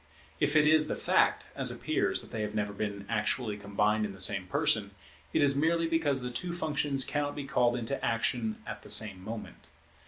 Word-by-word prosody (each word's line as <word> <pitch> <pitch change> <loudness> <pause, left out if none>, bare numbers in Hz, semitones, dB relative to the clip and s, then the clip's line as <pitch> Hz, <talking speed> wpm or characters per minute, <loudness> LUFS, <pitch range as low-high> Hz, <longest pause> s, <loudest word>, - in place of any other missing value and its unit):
If 145 0 0
it 150 -1 +5
is 155 0 +5
the - - -2
fact, - - +1
as - - +2
appears, - - 0
that - - -13
they 110 - -4
have 105 0 -4
never 105 -1 -2
been 100 -1 -4
actually 115 -5 -1
combined 105 +1 0
in 105 -2 -4
the 95 - -13
same 95 0 +3
person, 100 +1 0 0.4
it - - +2
is 140 -1 +3
merely 165 +3 +1
because 160 -5 +1
the 125 0 -4
two 170 +9 -3
functions 145 -5 +1
cannot 145 -1 -2
be 145 - -5
called 120 -3 +1
into 125 +3 -3
action 115 -1 -1
at - - -7
the - - -14
same 100 -4 +4
moment. 110 +2 -9
120 Hz, 200 wpm, -30 LUFS, 105-145 Hz, 0.4 s, it